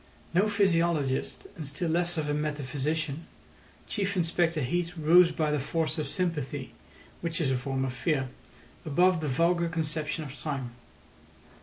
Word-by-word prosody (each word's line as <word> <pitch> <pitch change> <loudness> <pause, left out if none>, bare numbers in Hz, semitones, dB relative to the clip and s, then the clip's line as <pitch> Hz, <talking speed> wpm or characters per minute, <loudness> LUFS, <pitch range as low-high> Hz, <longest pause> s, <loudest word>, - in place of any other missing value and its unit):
No 190 +5 +4
physiologist, 170 -9 +1
and 155 -4 -6
still 160 +4 -2
less 175 +1 +1
of 155 -2 -1
a 150 - 0
metaphysician, 150 +1 -2 0.6
Chief 200 -1 -1
Inspector 170 -1 +1
Heat 170 +6 -1
rose 170 +3 +6
by 155 -2 0
the 150 - +1
force 160 +3 -1
of 150 - -2
sympathy, 145 -7 -2 0.5
which 170 -1 -2
is 145 -5 +1
a - - +2
form 130 +1 -1
of 130 - -3
fear, 135 0 0 0.5
above 175 +2 +3
the 155 - -2
vulgar 170 +5 +2
conception 155 -1 -2
of 140 -2 -8
time. 135 -5 -3
155 Hz, 150 wpm, -29 LUFS, 140-170 Hz, 0.6 s, rose